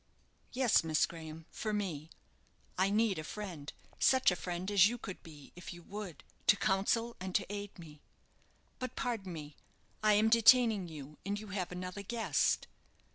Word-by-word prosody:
"Yes, 250 -7 +3
Miss 155 -1 +3
Graham, 160 -1 -9
for 215 -1 -3
me. 165 -7 -3 0.7
I 190 +1 +2
need 210 -3 +2
a - - -4
friend, 170 -6 -6 0.3
such 260 -6 +5
a - - 0
friend 180 +2 -4
as 195 -1 +7
you 240 +2 -2
could 195 -5 -8
be, 150 -4 -13
if 180 0 -8
you 175 - -13
would, 200 -4 -7 0.2
to 200 - +7
counsel 215 +4 +1
and 185 0 -5
to 195 - +2
aid 205 0 -6
me. 155 -4 -12 0.8
But, 255 - -5
pardon 220 -7 -3
me, 150 -3 -8 0.5
I 215 -1 +5
am 210 +2 +4
detaining 230 -4 +6
you, 150 -2 -10
and 200 +1 -2
you 215 -1 -9
have 185 -2 -3
another 180 +2 -5
guest." 225 +3 +1
195 Hz, 170 wpm, -33 LUFS, 170-215 Hz, 0.8 s, as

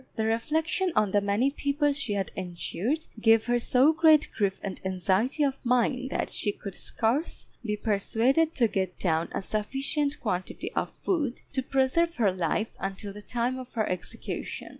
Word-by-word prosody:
The 220 - 0
reflection 315 - 0
on 210 -2 +3
the 205 - +3
many 205 +7 +2
people 285 +1 +1
she 275 -6 -2
had 195 -2 -2
injured 190 - -3
gave 225 0 +5
her 240 0 +2
so 260 +6 +4
great 315 -1 +5
grief 200 -3 0
and 195 -2 -5
anxiety 190 - +1
of 275 -1 -1
mind 250 +1 +1
that - - -2
she 205 - 0
could 200 -1 -8
scarce 245 - -1 0.2
be 210 -2 -1
persuaded 230 +10 +2
to 240 -4 +4
get 190 -4 -2
down 165 -2 0
a - - -3
sufficient 275 +8 -1
quantity 185 -5 -3
of - - -1
food 295 -10 -2
to 265 - +1
preserve 270 +6 +1
her 215 -5 +3
life 185 +4 -1
until 195 +1 -4
the 210 - -9
time 245 +4 -1
of 255 -1 -10
her 220 -2 +1
execution. 180 -2 -5
235 Hz, 170 wpm, -28 LUFS, 200-280 Hz, 0.2 s, gave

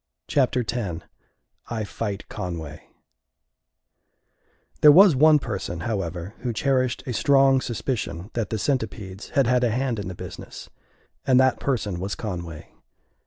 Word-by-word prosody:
Chapter 130 -3 +1
Ten 100 -7 -4 0.7
I 115 -2 -2
Fight 100 -1 -5
Conway 80 -4 -6 1.9
There 150 - +9
was 180 0 +7
one 155 +3 +6
person, 90 - -4
however, 90 -2 -3
who 120 -1 -3
cherished 130 +1 0
a 125 - -3
strong 135 +1 +4
suspicion 110 -6 -4
that 115 -3 -2
the 110 - -2
Centipedes 105 -6 -3
had 140 - +4
had 125 +1 +2
a 120 - +3
hand 120 0 -1
in 100 - -5
the 90 - -6
business; - - -9 0.6
and 130 -1 +5
that 130 -1 +3
person 105 -9 -2
was 95 +2 -3
Conway. 85 -7 -7
115 Hz, 135 wpm, -24 LUFS, 95-130 Hz, 1.9 s, There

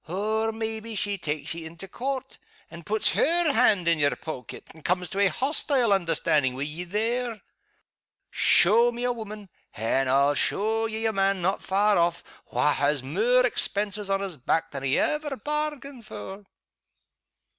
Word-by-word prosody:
Or, 215 +5 -1
maybe 220 0 -5
she 205 -1 -1
takes 150 -3 -3
ye 165 0 -7
into 165 +4 -9
Court, 265 +4 -5 0.3
and 170 0 -10
pets 215 +1 +2
her 335 -1 +3
hand 210 -8 +3
in 165 -2 +3
your 145 -1 +2
poaket, 145 -6 -8
and 160 - -17
comes 180 0 0
to 195 - -4
a 200 - +5
hoastile 265 - +1
understandin' 155 -7 +1
wi' 135 - -3
ye 155 +4 -5
there. 225 +4 -2 0.9
Show 230 +6 +5
me 240 +1 -6
a 245 0 +1
woman 215 -3 -8 0.3
and 130 +5 0
I'll 140 +2 +3
show 220 +9 0
ye 220 0 -4
a 220 - +1
man 195 -2 +1
not 190 +2 0
far 200 0 +2
off 170 0 +1 0.3
wha' 150 - +2
has 145 -1 +1
mair 230 - +2
expenses 205 -3 -2
on 195 0 +1
his 190 -5 -5
back 160 +6 -1
than 140 - -5
he 135 0 +1
ever 300 -2 0
bairgained 290 -1 -3
for." 200 -2 -9
200 Hz, 165 wpm, -26 LUFS, 170-230 Hz, 0.9 s, a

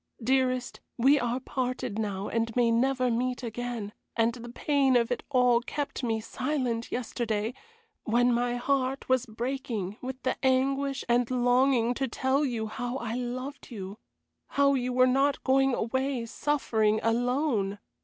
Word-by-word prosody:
Dearest, 255 0 +1 0.2
we 275 +4 +5
are 245 0 -1
parted 255 -5 -3
now 200 -2 -2
and 230 0 -1
may 240 -2 +3
never 255 +1 +2
meet 250 +2 -1
again, 235 -2 -4 0.2
and 230 +1 +3
the 240 0 -9
pain 270 +1 +2
of 235 0 +2
it 245 - -1
all 250 -3 +4
kept 285 +3 -4
me 225 -3 0
silent 245 0 -2
yesterday, 230 -2 -2 0.5
when 245 +2 +3
my 240 +1 +1
heart 265 +1 0
was 255 -1 +2
breaking 225 -4 -3
with 260 0 -5
the 260 - -2
anguish 270 +1 +1
and 240 0 +2
longing 245 -1 +3
to 270 +2 -1
tell 265 +4 +1
you 235 -5 -1
how 245 +4 -4
I 235 -3 -4
loved 255 +3 -5
you, 200 -3 -7 0.5
how 280 0 +3
you 250 -2 0
were 255 0 +5
not 270 +2 +2
going 270 -1 +3
away 260 +1 -1
suffering 220 -5 +1
alone. 235 -3 +1
245 Hz, 150 wpm, -28 LUFS, 230-265 Hz, 0.5 s, we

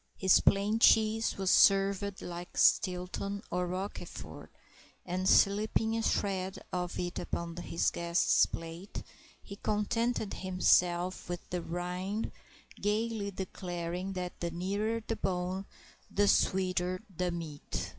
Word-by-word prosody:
His 190 -1 +5
plain 205 +3 +2
cheese 225 0 +4
was 190 -1 +1
served 195 0 +4
like 175 0 -7
Stilton 185 +3 +2
or 180 0 0
Roquefort, 185 +3 -6 0.6
and 185 +1 0
slipping 215 +2 +3
a 225 - 0
shred 190 -3 -1 0.2
of 180 -1 -2
it 175 0 -3
upon 170 -1 -4
his 170 -1 0
guest's 170 0 +3
plate, 165 +4 -7 0.4
he 200 - -9
contented 215 +1 -1
himself 180 -1 +2
with 175 -1 -5
the 180 -1 -1
rind, 180 +5 -3 0.5
gayly 210 0 0
declaring 180 -1 -4
that 180 -1 -5
the 170 - -2
nearer 200 +6 -2
the 225 - -2
bone 185 +1 -2 0.4
the 205 0 +2
sweeter 185 -1 +1
the 180 +1 0
meat. 165 -4 -5
185 Hz, 120 wpm, -31 LUFS, 180-200 Hz, 0.6 s, His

